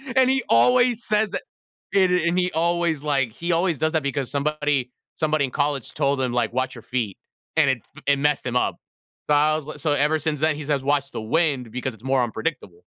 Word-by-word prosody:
And 260 -1 +5
he 265 0 +2
always 245 - +4
says 215 -1 +1
that - - -3 0.5
and 190 -2 +4
and 175 -1 +1
he 180 0 +2
always, 170 -2 0
like 135 -5 +1
he 170 +10 -3
always 170 -2 +1
does 155 +2 0
that 160 -2 +1
because 140 -2 -2
somebody 145 -3 0 0.2
somebody 155 -2 +1
in 130 - -2
college 145 -4 -1
told 140 0 +1
him, 130 -2 0
like, 120 -2 0
"Watch 130 +1 -1
your 115 - -11
feet," 115 -7 -3 0.4
and 155 -4 +4
it 125 -4 -2
f 155 - -14
it 140 -1 +4
messed 145 0 +1
him 125 -1 -3
up. - - +1 0.5
So 150 - +4
I 150 +1 +3
was, 155 -1 -3
like 155 - -8
so 150 +1 0
ever 150 +2 +2
since 150 -1 -2
then, 155 -1 +2
he 150 - -6
says, 140 -2 0
"Watch 140 0 0
the - - -4
wind 135 -1 0
because 125 +1 -4
it's 110 - -18
more 135 0 +1
unpredictable." 110 - -5
145 Hz, 225 wpm, -23 LUFS, 130-160 Hz, 0.5 s, And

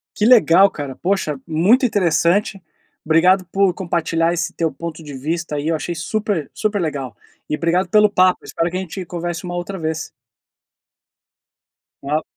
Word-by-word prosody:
Que 210 - 0
legal, 200 - +6
cara, 145 -6 -7
poxa, 170 -6 -1
muito 195 - +3
interessante. 195 0 +1 0.4
Obrigado 180 +4 +4
por 190 +1 +1
compartilhar 165 -2 0
esse 170 - -2
teu 165 -2 -1
ponto 165 +3 -7
de 145 -2 -9
vista 155 +4 -3
aí, 145 +2 -2
eu 165 - +1
achei 170 +3 -4
super 200 -2 -2
super 215 -1 -1
legal 140 - -3 0.3
e - - 0
obrigado 175 +3 0
pelo 210 +2 +5
papo. 185 -2 +3
Eu - - -14
espero 165 +1 -2
que 180 - -4
a - - -2
gente 190 0 -6
converse 175 0 -5
uma 175 -1 -5
outra 180 +2 -5
vez. 160 0 -3 1.9
Tchau. 150 +3 -1
170 Hz, 165 wpm, -19 LUFS, 160-190 Hz, 1.9 s, legal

